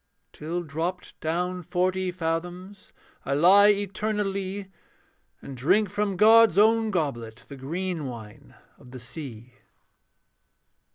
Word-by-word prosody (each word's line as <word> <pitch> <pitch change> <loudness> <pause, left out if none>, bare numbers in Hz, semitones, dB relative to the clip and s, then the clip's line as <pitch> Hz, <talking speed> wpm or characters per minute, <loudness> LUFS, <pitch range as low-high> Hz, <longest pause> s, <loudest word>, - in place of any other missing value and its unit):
Till 170 +3 -4
dropped 165 +4 -5
down 180 +3 -2
forty 185 +2 -1
fathoms, 180 +3 -5 0.3
I 140 - -1
lie 190 +7 +6
eternally; 200 -1 -2 0.7
And 135 - -8
drink 185 - +1
from 205 -2 -2
God's 225 -2 +6
own 220 +1 +4
goblet 120 - -3
The 140 - -10
green 165 +3 -4
wine 110 -4 -11 0.2
of 125 - -16
the 130 0 -10
sea. 125 -2 -9
180 Hz, 110 wpm, -25 LUFS, 145-200 Hz, 0.7 s, lie